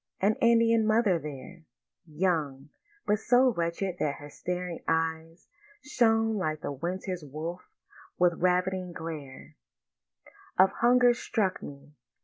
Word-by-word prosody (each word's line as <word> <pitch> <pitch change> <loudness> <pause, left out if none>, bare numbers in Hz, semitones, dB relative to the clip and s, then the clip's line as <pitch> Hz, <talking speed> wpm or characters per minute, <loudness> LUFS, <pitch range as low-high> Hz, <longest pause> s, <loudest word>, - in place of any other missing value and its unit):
An 205 +3 +3
Indian 230 -1 +4
mother 215 -5 +3
there, 150 +4 -9 0.5
Young, 150 -4 -1 0.4
but 210 0 +1
so 250 +2 +4
wretched 170 +1 -2
that 145 -2 0
her 145 0 -11
staring 180 0 -4
eyes 165 +1 -2 0.4
Shone 225 -5 +2
like 155 -5 -2
the - - -4
winter 180 +6 -4
wolf's 155 +5 -6 0.5
with 175 -1 +3
ravening 180 0 0
glare 155 -5 -8 1.0
Of 190 +1 +6
hunger, 245 +1 +4
struck 215 -5 -2
me. 140 +1 -11
180 Hz, 120 wpm, -28 LUFS, 155-215 Hz, 1.0 s, Of